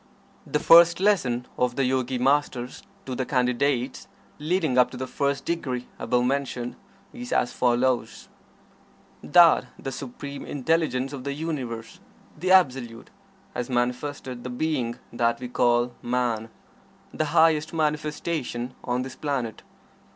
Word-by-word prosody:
The - - +1
first 170 +2 +7
lesson 135 -12 +2
of 125 -1 +1
the 135 - +1
Yogi 130 0 0
Masters 130 -1 0 0.2
to 130 - -4
the 130 - -1
Candidates, 125 0 0 0.3
leading 155 -3 0
up 125 -1 +5
to 125 - -9
the 130 - -3
first 140 +2 -1
degree, 130 -7 -2
above 125 0 +1
mentioned, 130 -2 -2 0.4
is 245 -1 -8
as 120 - +1
follows: 125 0 0 0.9
That 170 -6 +6
the 135 - -5
Supreme 140 +2 -7
Intelligence 145 -2 0
of 135 -2 -6
the 140 +1 -3
Universe 135 -7 -5 0.4
the 180 +4 -3
Absolute 130 -10 +2 0.4
has 125 - -4
manifested 125 +1 -2
the 125 - -5
being 125 -3 -2 0.2
that 115 0 +1
we 125 - -5
call 120 0 +2
Man 120 -2 -1 0.6
the 155 - 0
highest 155 0 +3
manifestation 150 -5 -2
on 125 +1 -1
this 130 - -8
planet. 130 -7 -3
130 Hz, 130 wpm, -25 LUFS, 125-150 Hz, 0.9 s, first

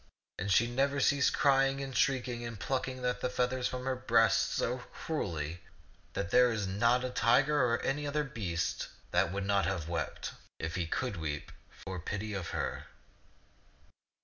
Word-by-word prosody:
And 100 +2 -2
she 115 +5 +5
never 135 +4 +1
ceased 140 +1 +3
crying 135 -1 +3
and 135 -2 -5
shrieking 125 -2 +1
and 115 -3 -6
plucking 130 0 -2
the 125 0 +2
feathers 125 0 0
from 125 0 -5
her 130 0 0
breast 130 +1 +3
so 125 +2 0
cruelly 85 - -4 0.5
that 100 0 -3
there 125 -1 +6
is 110 -3 -1
not 120 +6 +2
a 130 - -3
tiger 135 +5 +4
or 115 -1 +2
any 145 +2 -1
other 150 +1 0
beast 90 - -2 0.2
that 85 - +2
would 100 0 -2
not 100 0 +2
have 85 -4 -2
wept 85 - -3
— - - -34
if 80 +1 -3
he 85 -2 -1
could 115 +3 -2
weep 75 -3 -4 0.2
— - - -31
for 95 -2 -5
pity 105 +5 -4
of 95 -5 -3
her. - - -3
120 Hz, 175 wpm, -32 LUFS, 95-130 Hz, 0.5 s, there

